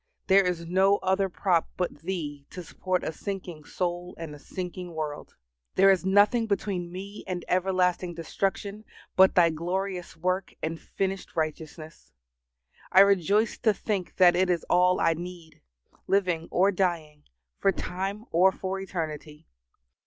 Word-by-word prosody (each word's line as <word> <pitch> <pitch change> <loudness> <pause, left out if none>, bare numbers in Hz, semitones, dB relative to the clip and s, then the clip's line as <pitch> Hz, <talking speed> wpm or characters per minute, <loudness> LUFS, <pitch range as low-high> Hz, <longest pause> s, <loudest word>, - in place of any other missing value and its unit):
there 195 0 +5
is 180 -2 -2
no 190 +3 +3
other 190 +1 +1
prop 170 0 +1
but 180 -5 -2
Thee 150 -5 -5
to 180 - -8
support 185 +2 -2
a - - -2
sinking 180 -5 -6
soul 175 0 -3
and 165 -2 -7
a 150 - -11
sinking 180 +1 -7
world. 150 -2 -5 0.4
There 195 +1 +6
is 190 -2 +2
nothing 205 +4 +4
between 195 -4 -2
me 200 +3 -8
and 180 -2 -4
everlasting 180 -1 +1
destruction 195 +5 -3 0.3
but 190 0 +6
Thy 170 -2 +5
glorious 180 +2 -3
work 185 +3 -2
and 160 +1 -3
finished 195 0 -4
righteousness. 155 0 -5 0.8
I 190 - +8
rejoice 200 +2 +3
to 220 -3 +2
think 200 -5 -3
that 180 -2 +6
it 185 +1 +2
is 175 -2 0
all 180 +1 +4
I 165 - +3
need 170 -1 -9 0.5
living 180 -4 +1
or 195 +3 +3
dying, 170 -6 -2 0.3
for 195 - +3
time 195 +4 -4
or 185 +3 +5
for 190 0 -4
eternity. 155 -5 -6
180 Hz, 145 wpm, -27 LUFS, 165-195 Hz, 0.8 s, I